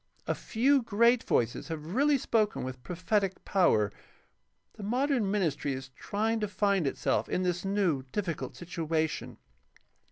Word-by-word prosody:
A - - 0
few 265 +5 +2
great 235 +2 +3
voices 120 0 0
have 160 +1 -5
really 285 +4 +4
spoken 220 -4 0
with 130 0 -6
prophetic 190 - -1
power. 110 - +3 0.8
The - - -11
modern 245 +1 +1
ministry 165 -8 0
is 130 0 -6
trying 215 - -1
to 210 - -1
find 195 -4 +1
itself - - 0
in 185 - 0
this 180 -1 -1
new, 195 -8 +1
difficult 180 -6 -3
situation. 160 -2 -2
195 Hz, 135 wpm, -30 LUFS, 160-220 Hz, 0.8 s, really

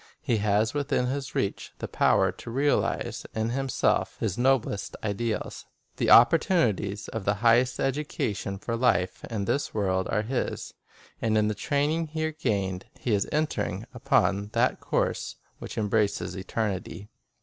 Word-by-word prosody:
He 115 - +1
has 105 +1 +1
within 140 -3 0
his 135 +1 -3
reach 100 - -2
the - - -5
power - - +3
to - - -10
realize 140 +5 0
in 110 +1 0
himself 135 0 0
his 105 -5 -1
noblest 125 -5 +1
ideals. 110 +1 -3 0.3
The - - 0
oppor 125 +8 +8
tunities 105 - 0
of 110 - -4
the 100 +1 +1
highest 120 +2 +4
education 130 -8 -2
for 115 +4 -3
life 105 -7 +1
in 105 -4 -3
this 140 +3 -1
world 95 -3 0
are 105 - +1
his. 125 +3 -3 0.5
And 110 -1 +2
in 105 0 +3
the - - 0
training 150 +7 0
here 155 +1 -2
gained, 100 -11 -2
he 120 - -1
is 100 -1 +1
enter 150 -8 0
ing 95 +5 -4
upon 105 -7 +1
that - - +2
course - - -1 0.2
which - - -8
embraces 105 -1 0
eternity. 100 0 -3
110 Hz, 150 wpm, -27 LUFS, 100-135 Hz, 0.5 s, oppor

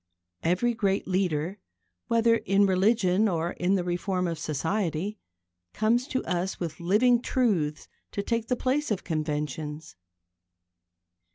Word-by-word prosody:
Every 185 +9 +1
great 200 -3 0
leader, 185 -1 0 0.5
whether 230 0 +4
in 200 -2 +3
religion 195 +1 +3
or 170 -1 -1
in 185 +2 +1
the 185 - 0
reform 180 +1 -1
of 165 -2 -3
society, 170 +5 -2 0.6
comes 235 +4 +2
to 260 - -2
us 180 +1 -2
with 165 -3 -4
living 225 +8 +3
truths 185 - 0 0.3
to 200 - -2
take 230 +1 -1
the 250 - +1
place 275 +4 0
of 210 -4 -1
conventions. 150 - -3
190 Hz, 125 wpm, -27 LUFS, 165-220 Hz, 0.6 s, whether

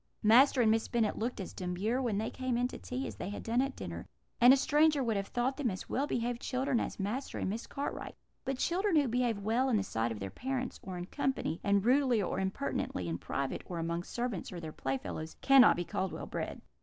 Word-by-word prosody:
"Master 250 +4 +6
and 220 - +5
Miss 225 0 +1
Bennet 225 -4 0
looked 235 +2 -2
as 190 - -6
demure 190 +8 -1
when 230 -6 0
they 220 +2 -2
came 255 -2 -1
in 245 +1 +2
to - - -8
tea 255 +2 -4
as - - -6
they - - -4
had 205 - -6
done 235 +3 +2
at 275 0 -2
dinner, - - -6 0.3
and 245 +1 +9
a 270 - +7
stranger 295 +1 +3
would 230 -3 0
have 195 0 -2
thought 250 +2 -1
them 280 -5 0
as 185 -2 -6
well 280 +3 0
behaved 240 -1 -1
children 260 -1 0
as - - -4
Master 220 +8 -3
and 190 - -1
Miss 225 +3 -5
Cartwright; 280 - -5 0.3
but 270 -1 -2
children 365 +6 +1
who 290 -3 +4
behave 240 -2 +1
well 225 +6 +1
in 230 - +3
the 200 - +1
sight 115 -10 -1
of 110 - -5
their 95 -1 -5
parents, 260 -1 -3
or 185 -1 -6
in 175 - -4
company, 265 - -2
and 200 0 +2
rudely 255 -2 +4
or 190 -1 -1
impertinently 190 - -2
in 85 +1 -3
private, 135 -1 -3
or 175 - -5
among 170 +1 -1
servants 240 0 -4
or 180 - -6
their 160 -2 -6
playfellows, 135 +4 -4
cannot 270 -3 +7
be 175 - -3
called 190 -1 -2
well - - -6
bred. - - -4
230 Hz, 235 wpm, -32 LUFS, 190-260 Hz, 0.3 s, and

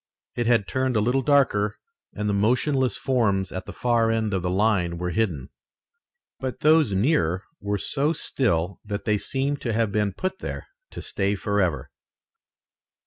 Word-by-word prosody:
It 120 -1 -1
had 115 -4 +3
turned 130 -1 0
a - - +4
little 125 +5 +2
darker 120 -7 +2 0.4
and 105 0 -3
the 105 - +1
motionless 125 +6 +2
forms 100 -8 +1
at 95 - -6
the - - -5
far 120 -2 +1
end 110 -2 0
of 95 - 0
the 90 - -1
line 95 -3 +1
were 90 +1 -2
hidden. 85 - -1 0.9
But 130 -2 -4
those 155 -6 +5
nearer 95 - +1 0.2
were 100 0 -1
so 145 +8 0
still 100 - -1
that 105 -1 -5
they 105 -2 +2
seemed 140 +4 -2
to 115 - -2
have 110 -1 +1
been 105 -1 0
put 185 - -3
there - - -5 0.2
to - - -8
stay 100 +1 -1
forever. 100 -5 -1
105 Hz, 165 wpm, -25 LUFS, 100-130 Hz, 0.9 s, those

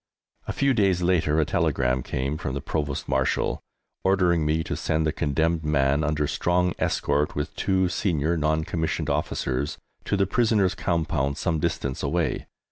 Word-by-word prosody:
A - - -1
few 140 -1 +2
days 95 -6 +2
later 80 -4 +2
a 80 - +3
telegram 65 -2 +1
came 65 +4 -2
from 65 - -3
the - - -2
Provost 70 -1 -3
Marshal 65 -1 0 0.4
ordering 90 -5 +3
me 80 +1 +1
to - - -3
send 80 0 0
the 80 - +2
condemned 80 +4 0
man 70 0 +2
under 75 0 0
strong 90 +3 +1
escort, 75 +1 0
with 75 - -3
two 95 -1 +1
senior 85 -3 0
non 80 0 +1
commissioned 80 0 -2
officers, 70 +5 -1 0.3
to 100 - 0
the 95 - +3
prisoners' 105 -2 +2
compound 80 -5 -1
some 80 -3 0
distance 70 -2 -2
away. 85 +3 -1
80 Hz, 160 wpm, -25 LUFS, 70-90 Hz, 0.4 s, a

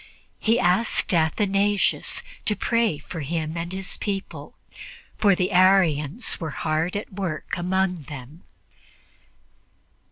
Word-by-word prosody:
He 225 +2 +2
asked 185 +4 +1
Athanasius 195 +5 +1 0.2
to 210 - +2
pray 230 -4 +1
for 160 +3 -8
him 155 +2 -3
and 170 +1 -4
his 190 0 -4
people, 200 -2 -5 0.6
for 200 -3 +5
the 185 +2 0
Arians 185 - +3
were 160 - -3
hard 155 +4 -1
at 205 0 -5
work 185 -5 -4
among 180 -2 0
them. 145 +3 -9
180 Hz, 115 wpm, -24 LUFS, 160-200 Hz, 0.6 s, for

